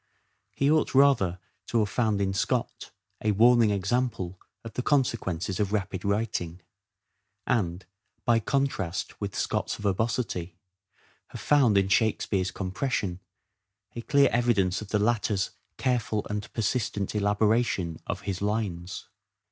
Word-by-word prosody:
He 140 Hz, +2 st, +2 dB
ought, 155 Hz, -3 st, +2 dB
rather, 130 Hz, -11 st, +4 dB, 0.3 s
to 120 Hz, -, 0 dB
have 105 Hz, -2 st, +2 dB
found 110 Hz, -4 st, +1 dB
in 95 Hz, -1 st, 0 dB
Scott 95 Hz, -, -2 dB, 0.3 s
a 105 Hz, -1 st, +2 dB
warning 115 Hz, +1 st, +5 dB
example 100 Hz, -2 st, -1 dB, 0.2 s
of 115 Hz, -, -8 dB
the -, -, -2 dB
consequences 115 Hz, -, 0 dB
of 100 Hz, -2 st, 0 dB
rapid 100 Hz, -3 st, -2 dB
writing; 100 Hz, -5 st, -2 dB, 0.8 s
and, 95 Hz, -7 st, 0 dB, 0.4 s
by 120 Hz, -2 st, +4 dB
contrast 115 Hz, -8 st, -2 dB
with -, -, -4 dB
Scott's -, -, -1 dB
verbosity, 100 Hz, -4 st, -2 dB, 0.7 s
have -, -, -9 dB
found 130 Hz, -8 st, +4 dB
in 95 Hz, -1 st, +3 dB
Shakespeare's 100 Hz, -2 st, +1 dB
compression 95 Hz, -1 st, -2 dB, 0.8 s
a 120 Hz, -, -4 dB
clear 140 Hz, +1 st, +4 dB
evidence 110 Hz, -6 st, +2 dB
of 105 Hz, -, -7 dB
the 105 Hz, -, +1 dB
latter's 105 Hz, -3 st, +1 dB, 0.3 s
careful 120 Hz, -5 st, 0 dB
and 105 Hz, 0 st, -4 dB
persistent 110 Hz, -3 st, -1 dB
elabora 105 Hz, +2 st, +3 dB
tion 85 Hz, -8 st, -3 dB
of -, -, -3 dB
his 95 Hz, -2 st, -4 dB
lines. 100 Hz, -4 st, -2 dB
105 Hz, 130 wpm, -27 LUFS, 95-120 Hz, 0.8 s, warning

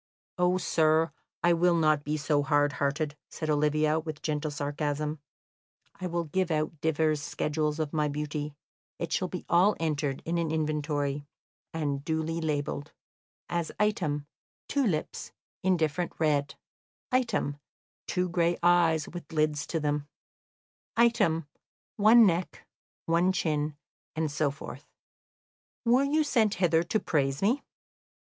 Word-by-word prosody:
"Oh, 180 Hz, +1 st, +3 dB
sir, 160 Hz, -2 st, +2 dB, 0.3 s
I 175 Hz, 0 st, +5 dB
will 175 Hz, +1 st, +3 dB
not 155 Hz, -3 st, +3 dB
be 150 Hz, +1 st, -1 dB
so 150 Hz, -1 st, +1 dB
hard 145 Hz, 0 st, +2 dB
hearted," 145 Hz, +1 st, 0 dB
said 155 Hz, -1 st, -3 dB
Olivia, 150 Hz, +1 st, +2 dB
with 155 Hz, -2 st, -7 dB
gentle 155 Hz, 0 st, -1 dB
sarcasm; 145 Hz, +1 st, -2 dB, 0.8 s
"I 185 Hz, -, -3 dB
will 170 Hz, -1 st, -1 dB
give 180 Hz, +3 st, -1 dB
out 155 Hz, -1 st, -1 dB
divers 155 Hz, -1 st, +1 dB
schedules 150 Hz, +1 st, -1 dB
of 155 Hz, -2 st, -2 dB
my 150 Hz, -1 st, +1 dB
beauty; 150 Hz, 0 st, -3 dB, 0.4 s
it 170 Hz, -2 st, -3 dB
shall 185 Hz, -, +1 dB
be 180 Hz, 0 st, -6 dB
all 185 Hz, +5 st, +4 dB
entered 150 Hz, -4 st, -1 dB
in 170 Hz, +1 st, 0 dB
an 165 Hz, -2 st, 0 dB
inventory, 150 Hz, -2 st, -1 dB, 0.4 s
and 145 Hz, -3 st, -2 dB
duly 160 Hz, +1 st, -1 dB
labelled; 145 Hz, -1 st, -2 dB, 0.5 s
as, 170 Hz, -2 st, -2 dB
item, 165 Hz, -9 st, 0 dB, 0.4 s
two 280 Hz, -1 st, +1 dB
lips, 155 Hz, -6 st, -3 dB, 0.3 s
indifferent 175 Hz, -2 st, +1 dB
red; 145 Hz, -2 st, +1 dB, 0.6 s
item, 230 Hz, -, 0 dB, 0.5 s
two 180 Hz, 0 st, 0 dB
gray 170 Hz, -1 st, +1 dB
eyes, 170 Hz, -3 st, +4 dB
with 175 Hz, -3 st, -9 dB
lids 155 Hz, -2 st, 0 dB
to 165 Hz, -, -1 dB
them; 150 Hz, -1 st, -1 dB, 0.9 s
item, 210 Hz, -, +3 dB, 0.5 s
one 220 Hz, +2 st, +7 dB
neck, 175 Hz, -1 st, -1 dB, 0.4 s
one 170 Hz, +3 st, +3 dB
chin, 150 Hz, -4 st, -1 dB, 0.4 s
and 155 Hz, -2 st, -1 dB
so 150 Hz, 0 st, +1 dB
forth. 140 Hz, +2 st, -9 dB, 1.0 s
Were 245 Hz, +3 st, +5 dB
you 305 Hz, +2 st, +2 dB
sent 225 Hz, -8 st, +2 dB
hither 170 Hz, -3 st, +3 dB
to 175 Hz, +6 st, 0 dB
praise 140 Hz, -3 st, 0 dB
me?" 245 Hz, +8 st, +2 dB
155 Hz, 135 wpm, -29 LUFS, 150-175 Hz, 1.0 s, one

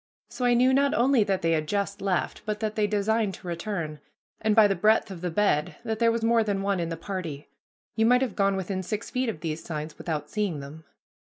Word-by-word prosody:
So 250 Hz, -, -3 dB
I 245 Hz, 0 st, +4 dB
knew 255 Hz, +2 st, +4 dB
not 280 Hz, +1 st, +3 dB
only 245 Hz, -1 st, +4 dB
that 195 Hz, -3 st, -1 dB
they 165 Hz, -, +2 dB
had 155 Hz, -2 st, 0 dB
just 200 Hz, +1 st, -2 dB
left, 190 Hz, -2 st, -1 dB
but 210 Hz, 0 st, -3 dB
that 215 Hz, -1 st, -2 dB
they 215 Hz, -1 st, +1 dB
designed 210 Hz, 0 st, 0 dB
to -, -, -12 dB
return, 170 Hz, -3 st, -4 dB, 0.4 s
and 215 Hz, -1 st, +1 dB
by 220 Hz, -2 st, +7 dB
the 200 Hz, -, +1 dB
breadth 215 Hz, +3 st, +2 dB
of 175 Hz, -3 st, -8 dB
the 180 Hz, -, -1 dB
bed 165 Hz, -4 st, +1 dB
that 220 Hz, -2 st, -3 dB
there 230 Hz, -1 st, +4 dB
was 230 Hz, 0 st, -2 dB
more 230 Hz, 0 st, +4 dB
than 200 Hz, -2 st, -1 dB
one 200 Hz, -2 st, 0 dB
in 170 Hz, -1 st, -2 dB
the 165 Hz, -, -4 dB
party. 165 Hz, -5 st, -6 dB, 0.5 s
You 225 Hz, 0 st, +3 dB
might 250 Hz, +2 st, +5 dB
have 240 Hz, -7 st, -3 dB
gone 195 Hz, -1 st, +2 dB
within 190 Hz, 0 st, -2 dB
six 210 Hz, +4 st, -4 dB
feet 255 Hz, -1 st, 0 dB
of 180 Hz, -9 st, -5 dB
these 160 Hz, -1 st, -4 dB
signs 155 Hz, -1 st, -6 dB
without 155 Hz, -3 st, -3 dB
seeing 200 Hz, -8 st, -2 dB
them. 150 Hz, +3 st, -10 dB
200 Hz, 235 wpm, -26 LUFS, 170-220 Hz, 0.5 s, by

